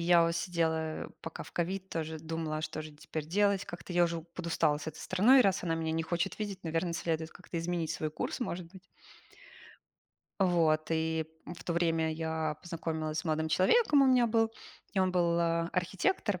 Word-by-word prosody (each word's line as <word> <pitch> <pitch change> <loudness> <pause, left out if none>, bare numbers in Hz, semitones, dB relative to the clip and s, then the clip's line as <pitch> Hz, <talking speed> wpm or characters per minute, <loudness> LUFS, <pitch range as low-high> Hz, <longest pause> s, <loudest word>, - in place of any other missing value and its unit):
я 170 0 +5
вот 165 0 +1
сидела 160 -2 -1
пока 160 - -6
в - - -13
ковид, 190 +2 -2
тоже 160 -1 -3
думала, 160 -1 -3
а 155 - -5
что 155 0 -4
же 155 0 -8
теперь 150 +1 -6
делать? 200 +3 +2
Как-то 175 +1 -8
я 175 0 +5
уже 170 -1 -2
подустала 165 -3 0
с 150 - -8
этой 160 - -6
страной, 235 +8 +5
раз 195 -5 +2
она 165 -2 0
меня 160 -1 -1
не 165 0 0
хочет 175 +3 -2
видеть, 200 -4 -5
наверно, 165 +1 -1
следует 160 -1 -2
как-то 180 -1 -7
изменить 165 -1 -1
свой 155 - -2
курс, 155 - -4
может 180 -7 -3
быть. 190 -1 -14 1.6
Вот, 165 -4 +3
и 160 0 0 0.2
в 175 -1 -8
то 170 - -1
время 165 -2 +1
я 160 -1 -2
познакомилась 160 -2 -3
с - - -14
молодым 160 -1 0
человеком, 290 - +5
у 270 - +5
меня 250 -2 +5
был, 225 0 +2 0.4
и 195 - -1
он 185 -1 +3
был, 170 -2 +2
а, 165 0 +1
архитектор. 185 - 0
170 Hz, 190 wpm, -31 LUFS, 160-185 Hz, 1.6 s, я